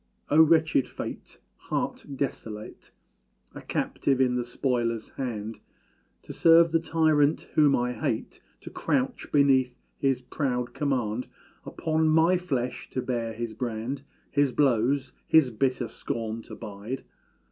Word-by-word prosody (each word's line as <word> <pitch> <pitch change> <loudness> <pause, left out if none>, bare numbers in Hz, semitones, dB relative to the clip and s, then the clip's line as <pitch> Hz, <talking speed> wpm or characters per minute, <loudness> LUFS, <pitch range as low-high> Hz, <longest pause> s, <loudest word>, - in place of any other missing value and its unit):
Oh, 155 +2 +7
wretched 160 -4 +4
fate! - - -7 0.2
heart - - -3
desolate, 110 -6 -5 0.6
A - - -9
captive 135 -2 -1
in 130 -1 +3
the 125 - 0
spoiler's 120 -2 -1
hand, 115 -4 -5 0.6
To - - -8
serve 165 0 +6
the 165 - +3
tyrant, 155 -2 +2
whom 150 -2 +5
I 125 0 0
hate 115 - -3 0.2
To - - -9
crouch - - -1
beneath 130 -3 +4 0.2
his 135 -2 +1
proud 125 -3 -2
command 125 -5 -1 0.4
Upon 160 0 0
my 165 +3 +5
flesh 130 -9 -3
to 130 - -1
bear 115 -3 -2
his 115 0 -4
brand 120 +3 -3 0.3
His 145 -2 +2
blows, 130 0 +2
his 155 -6 +5
bitter 125 +2 0
scorn 115 0 -4
to - - -9
bide! 105 +6 -6
130 Hz, 130 wpm, -27 LUFS, 120-145 Hz, 0.6 s, Oh